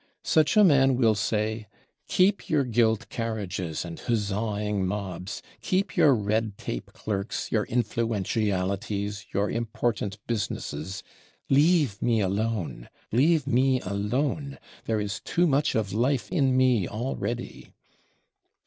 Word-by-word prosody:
Such 155 +6 +3
a 210 - +8
man 135 -7 +5
will 115 -3 +4
say: 110 +1 -1 0.4
"Keep 195 +2 +2
your 150 -3 +3
gilt 115 -2 +1
carriages 95 -8 -3
and 85 -1 -7
huzzaing 105 -2 -1
mobs, 95 -1 -4 0.2
keep 190 -1 0
your 140 -4 +5
red 110 0 -1
tape - - -5
clerks, 100 0 -3
your 110 -2 +1
influentialities, 105 -2 -1
your 100 +1 +1
important 115 -3 -2
businesses. 95 -5 -3 0.5
Leave 145 - +3
me 115 -2 +2
alone, 100 - -2 0.2
leave 145 +5 +3
me 130 0 +3
alone; 130 +9 -2 0.3
there 110 -1 0
is 105 -1 -3
too 175 - +1
much 145 -2 +2
of 105 -4 -1
life 125 +6 0
in 135 -7 +2
me 125 -7 +3
already!" 120 +1 -4
110 Hz, 120 wpm, -26 LUFS, 100-130 Hz, 0.5 s, a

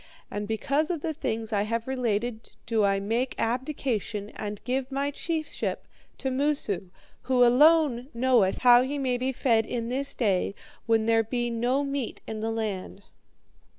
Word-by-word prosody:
And 205 0 -3
because 280 - 0
of 335 -4 -2
the 320 0 -2
things 225 -7 -3
I 200 - +2
have 230 +3 -2
related 240 -3 -2
do 225 -2 +1
I 195 -1 +2
make 230 +6 -1
abdication 230 -4 -2
and 210 -1 -5
give 260 +1 -2
my 280 +1 -1
chiefship 315 +1 -3 0.3
to 265 - -2
Moosu, 260 -9 -1 0.4
who 250 -1 +5
alone 275 -1 +4
knoweth 235 -5 +3
how 245 0 +8
ye 275 +3 -2
may 260 -3 0
be 260 +1 0
fed 230 -4 +2
in 235 -1 -3
this 275 +3 -2
day 200 -4 +1 0.3
when 225 -1 +3
there 225 0 +4
be 240 +1 -2
no 245 +4 +1
meat 275 -3 -3
in 220 - -5
the 220 +1 -2
land.' 210 -3 -4
240 Hz, 160 wpm, -27 LUFS, 220-265 Hz, 0.4 s, how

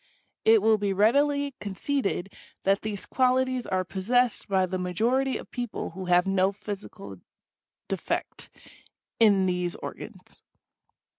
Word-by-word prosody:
It 220 -2 +6
will 220 -1 +4
be 200 -1 0
readily 280 +7 +2
conceded 200 -1 -2 0.3
that 195 +1 +2
these 210 -2 -5
qualities 255 -1 +1
are 185 0 0
possessed 230 +6 0
by 190 -2 +2
the 185 0 -3
majority 235 +9 0
of - - -11
people 245 -3 -4
who 190 +2 -7
have 180 0 +4
no 195 0 +2
physical 200 - -8 0.7
defect - - -3 0.7
in 200 -4 +5
these 180 -1 -1
organs. - - -9
205 Hz, 125 wpm, -27 LUFS, 190-245 Hz, 0.7 s, It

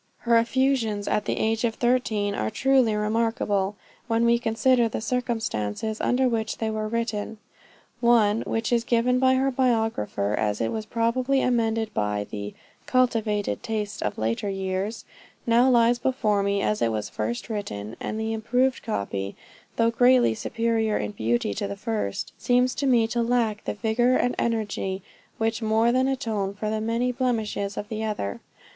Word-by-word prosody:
Her 235 -1 +3
effusions 235 -4 0
at 210 - 0
the - - -1
age 225 +1 0
of 225 -2 0
thirteen 230 -5 +1
are 110 - -1
truly 260 - +2
remarkable, 210 -2 0 0.3
when 230 0 +2
we 235 0 +4
consider 240 +1 +2
the - - -3
circumstances 220 - -2
under 255 +1 +2
which 225 -2 -1
they 220 -1 -2
were 215 0 -2
written. 220 -1 -3 0.6
One, 230 -3 +4
which 225 +1 -1
is 235 -1 +2
given 240 +2 +2
by 260 0 +4
her 270 +1 +2
biographer 225 - 0
as 105 -1 0
it 115 - 0
was 220 -1 -4
probably 250 +4 +1
amended 225 -3 0
by 105 -1 -1
the 105 0 -6 0.3
'cultivated 225 -5 +1
taste 215 -2 -3
of - - -2
later 115 - -1
years,' 195 +2 -3 0.4
now 240 +2 +4
lies 240 -1 +4
before 225 -6 +1
me 200 0 0
as 210 - 0
it 115 - +2
was 105 -1 -2
first 110 +2 -4
written; 115 - -5
and 215 - -4
the 220 0 -2
improved 250 +4 +1
copy, 100 - -3 0.4
though 230 0 +3
greatly 245 - +4
superior 225 - 0
in 105 0 -3
beauty 115 0 0
to 200 - -3
the 200 0 -6
first, 215 - -3
seems 250 +1 +2
to 280 -1 -1
me 240 -3 +4
to 235 +1 -1
lack 230 -3 0
the - - -2
vigor 240 +4 +2
and 245 - +1
energy, 205 -4 -2 0.3
which 225 +1 -1
more 220 +1 +3
than 255 +1 +2
atone 215 -7 -2
for 215 +1 -3
the 215 0 -1
many 230 +3 0
blemishes 220 -5 -2
of 205 - -4
the 220 0 -3
other. 205 - -3
225 Hz, 165 wpm, -25 LUFS, 205-240 Hz, 0.6 s, we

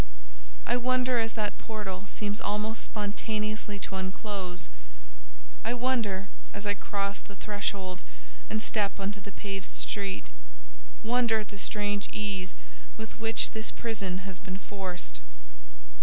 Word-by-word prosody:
I 240 - +4
wonder 255 0 +4
as 225 0 +2
that 210 -2 0
portal 205 -3 -3
seems 205 0 0
almost 210 +2 +1
spontaneously 215 0 0
to 195 - -1
unclose—I 60 - -4
wonder 230 -6 +2 0.3
as 205 +1 -4
I 205 - +5
cross 200 0 0
the 200 - -10
threshold 200 -3 0 0.5
and 215 0 +1
step 205 -3 +2
on 195 0 +1
the 200 -1 -5
paved 195 -1 -3
street, 195 - 0 0.7
wonder 235 -1 +5
at 210 - -7
the 200 - -3
strange 205 0 +2
ease 195 -3 0 0.4
with 220 +1 -5
which 225 0 +5
this 220 0 0
prison 195 -5 -1
has 190 -2 -4
been 185 0 -3
forced. 185 - -3
205 Hz, 125 wpm, -32 LUFS, 190-220 Hz, 0.7 s, I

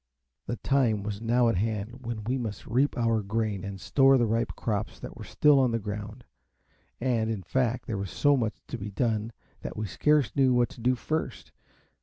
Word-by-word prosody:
The 120 - -1
time 120 -6 +1
was 105 0 -4
now 120 +1 +3
at 115 - +2
hand 110 +4 -3
when 115 -2 -4
we 125 +5 -1
must 105 -5 -5
reap 130 +5 +1
our 115 -2 +2
grain 105 -1 -2
and 100 -1 -6
store 135 +5 +4
the 120 - +3
ripe 115 +2 0
crops 110 -1 -3
that - - -8
were - - -9
still 150 -2 +4
on 130 -2 +3
the 115 - 0
ground; 105 +2 -6 0.8
and, 120 -3 0
in 105 -4 -3
fact, 120 +5 0
there 110 -5 -3
was 100 -1 -4
so 145 - +3
much 115 -5 -1
to - - -5
be 100 +1 -5
done, 110 +1 -1 0.3
that - - -6
we 110 - -2
scarce 145 - +2
knew 130 -2 +4
what 120 -1 +3
to - - -12
do 125 +2 +3
first. 155 +6 -4
115 Hz, 205 wpm, -28 LUFS, 105-125 Hz, 0.8 s, store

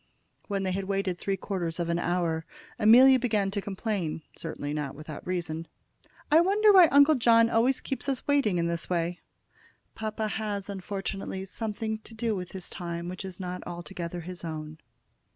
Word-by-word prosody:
When 200 -2 -1
they 190 - 0
had 195 +1 -2
waited 195 -2 -1
three 195 -1 -1
quarters 175 -5 -3
of 170 - -1
an 170 0 0
hour 170 -2 0 0.4
Amelia 255 +5 +8
began 210 -5 +1
to 200 0 -2
complain, 195 -5 -3
certainly 145 -3 -5
not 150 -3 -3
without 155 +1 -9
reason. 165 -3 -3 0.6
"I 310 - +8
wonder 410 +3 +5
why 365 -3 +9
Uncle 285 +1 +6
John 230 -3 +5
always 245 +4 +2
keeps 270 +1 -4
us 270 - -2
waiting 275 -10 +2
in 170 - +1
this 170 0 -1
way?" 175 0 -1 0.7
"Papa 215 0 -3
has, 210 -2 -3
unfortunately, 195 0 -4
something 220 +2 -4
to 225 - -13
do 225 -1 -1
with 180 -2 -6
his 185 -2 -5
time, 170 -1 -5
which 185 +2 -6
is 190 -1 -8
not 180 -1 -4
altogether 175 0 -6
his 180 +1 -8
own." 155 -1 -6
195 Hz, 170 wpm, -28 LUFS, 170-220 Hz, 0.7 s, why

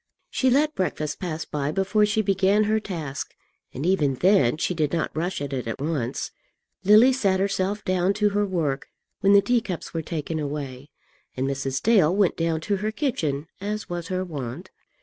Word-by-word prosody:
She 260 - +2
let 295 +4 +3
breakfast 155 - -2
pass 160 -3 -4
by 145 -1 -2
before 205 +4 +2
she 215 +1 +1
began 195 +1 +3
her 215 +1 +2
task, 160 -10 -5 0.4
and 140 - -5
even 150 -7 +2
then 175 -5 +3
she 180 - 0
did 155 -4 0
not 165 -2 -2
rush 175 +4 -2
at 140 -1 -5
it 125 -3 -3
at 115 - -4
once. 140 -4 -2 0.5
Lily 215 +6 +7
sat 195 -7 +1
herself 195 +1 -1
down 185 +1 +2
to 210 0 +2
her 205 +1 +1
work 155 -7 -1 0.3
when 200 +1 +4
the 200 0 +7
teacups 220 -5 -1
were 165 - -1
taken 160 0 -4
away, 140 -2 -5 0.5
and 130 +1 0
Mrs. 135 -1 -2
Dale 195 -7 +4
went 200 -3 +3
down 165 -1 -1
to 200 +4 0
her 210 +3 -1
kitchen 160 - -1
as 210 +2 -4
was 175 -1 -4
her 185 0 -1
wont. 145 +1 -6
180 Hz, 185 wpm, -25 LUFS, 150-205 Hz, 0.5 s, Lily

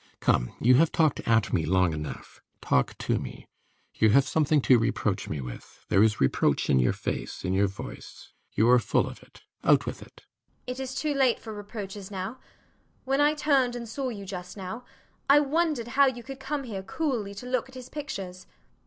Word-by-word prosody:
Come! - - +1
you 125 +2 +5
have 165 +2 +4
talked 155 -3 +2
at 115 -3 +2
me 80 - +2
long 90 0 +2
enough. 75 -1 -7 0.2
Talk 65 - +1
to - - 0
me. - - -8 0.5
You 110 - +3
have 135 +5 +4
something 155 -1 +2
to 130 -2 +5
reproach 115 -4 -1
me 75 -3 -3
with. 60 -1 -10
There 95 - +4
is 110 -1 +3
reproach 65 - +2
in 65 - +4
your 60 - +3
face, - - -4
in 90 - 0
your 100 +1 +3
voice: 95 - -10 0.2
you 110 - +3
are 125 0 +7
full - - +1
of - - -9
it. - - -19 0.2
Out - - +4
with - - -5
it. - - -15 0.4
JENNIFER. 250 +1 -5
It - - -1
is 265 0 -6
too 300 +1 -1
late 265 -3 +3
for 220 - -8
reproaches 205 -1 -7
now. 200 +5 -5 0.7
When 270 +2 +2
I 295 +1 +4
turned 275 -5 +2
and 235 -1 -6
saw 260 +4 -3
you 205 -4 -7
just 180 0 -7
now, 205 +6 -6 0.4
I 285 +1 +8
wondered 295 -4 0
how 275 +3 +5
you 245 -2 -3
could 270 +2 -8
come 275 +1 -3
here 210 -6 -5
coolly 220 -3 -2
to 205 - -8
look 255 0 -1
at 260 - -15
his 255 -1 -8
pictures. 195 -12 -7
205 Hz, 205 wpm, -27 LUFS, -, 0.7 s, I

